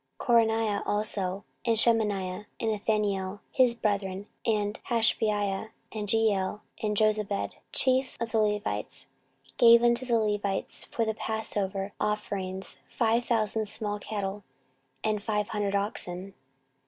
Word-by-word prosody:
14:035:009 235 -2 +5
Conaniah 220 -2 0
also, 200 -2 -1 0.2
and 230 -2 +2
Shemaiah 210 -4 +2
and 225 - 0
Nethaneel, 205 -2 -1
his 250 -3 +4
brethren, 200 -3 -1 0.2
and 210 -2 0
Hashabiah 215 -3 +1 0.2
and 210 -2 -4
Jeiel 210 -2 +1 0.2
and 210 -1 0
Jozabad, 215 -2 +1 0.2
chief 260 0 +2
of 230 -1 -3
the 225 - +2
Levites, 210 -1 -1 0.5
gave 235 0 +8
unto 240 +1 +3
the 235 -2 +3
Levites 205 -2 -2
for 230 - -1
passover 205 -3 -2
offerings 195 -3 -3
five 230 0 +1
thousand 220 -2 +1
small 210 -1 -2
cattle, 205 -1 -4 0.6
and 215 -1 0
five 210 -1 -1
hundred 205 -2 -1
oxen. 195 -2 0
210 Hz, 120 wpm, -28 LUFS, 200-225 Hz, 0.6 s, gave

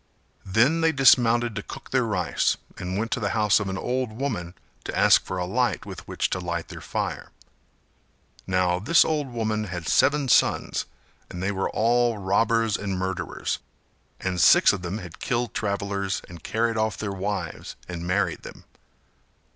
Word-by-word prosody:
Then 125 - +3
they 160 0 +4
dismounted 120 -4 +4
to 105 - -3
cook - - -10
their 130 -2 +2
rice, 90 -5 0 0.2
and 90 +1 -3
went 115 +2 -2
to - - 0
the 105 -3 -1
house 105 -1 +4
of 100 -2 -3
an 95 - -3
old 125 +2 -2
woman 110 -8 -4 0.3
to - - -4
ask - - +5
for 95 - -5
a 90 - -1
light 120 +7 0
with - - -9
which - - -1
to 90 - -1
light 85 -2 -4
their - - -9
fire. - - -4 1.2
Now 90 -1 +1
this 145 - +4
old 150 -3 -1
woman 110 -3 -2
had 90 -4 -6
seven 145 0 +3
sons - - +2 0.4
and 90 +1 -6
they 100 - 0
were 95 -1 -1
all 120 0 +2
robbers 110 +3 +1
and 100 -2 -3
murderers; 95 -1 -3 0.6
and 90 -2 -1
six - - +7
of - - -4
them 90 +3 -4
had 90 -6 -10
killed 120 -2 -1
travellers 100 -3 -2
and 85 -2 -11
carried 115 +6 -1
off 110 -1 0
their 100 -2 -3
wives 100 +1 -4
and 85 -1 -6
married 100 +3 0
them. - - -11
105 Hz, 170 wpm, -25 LUFS, 95-120 Hz, 1.2 s, six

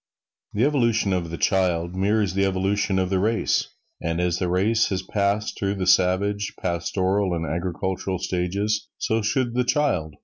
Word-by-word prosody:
The 105 - +1
evolution 115 -8 +2
of 85 -2 -1
the 85 - -5
child 90 -3 +1
mirrors 100 +1 +1
the 100 +1 +1
evolution 95 +1 0
of 95 0 0
the 95 - +2
race. 110 +4 +1 0.3
And 85 +1 -2
as 90 0 0
the 90 - -1
race 105 +6 +2
has 95 -1 -2
passed 100 +2 -1
through 100 0 -1
the 95 -2 -2
savage, 95 +3 +2
pastoral 95 +2 0
and 85 0 -2
agricultural 95 +3 -2
stages, 95 +4 -1
so 110 +1 0
should 120 +3 0
the 125 +1 +2
child. 120 - 0
95 Hz, 165 wpm, -24 LUFS, 90-105 Hz, 0.3 s, evolution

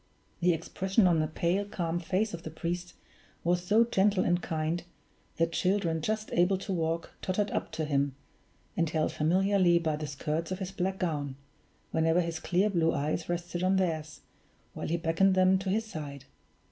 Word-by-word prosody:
The 180 0 +4
expression 190 +5 +1
on 170 -3 +4
the 155 - +1
pale, 175 +5 0
calm 175 -4 -2
face 190 +5 0
of 170 - -5
the 160 - -6
priest 175 +3 -4 0.5
was 175 +1 +1
so 210 +5 +5
gentle 200 -4 +2
and 175 0 +2
kind, 160 0 -1 0.6
that 165 0 +2
children 175 -2 +1
just 215 +5 -2
able 180 +3 +3
to 195 +1 -4
walk 165 -1 -1
tottered 200 +2 0
up - - -2
to 160 - -1
him, 140 -2 0 0.6
and 165 -2 +1
held 155 -1 0
familiarly 185 +2 +3
by 160 -3 0
the 150 0 -4
skirts 155 +4 -3
of 185 - -1
his 190 -1 -5
black 190 0 -2
gown, 145 -7 -2 0.6
whenever 165 +2 +3
his 165 -1 -3
clear 190 +6 +1
blue 165 -3 +2
eyes 155 +4 -2
rested 175 0 -3
on 185 +1 +3
theirs, 160 -5 -1 0.5
while - - -5
he 170 - 0
beckoned 170 +4 +3
them 185 0 +4
to 190 0 -3
his 220 +4 +1
side. 145 -9 -7
175 Hz, 180 wpm, -30 LUFS, 160-190 Hz, 0.6 s, so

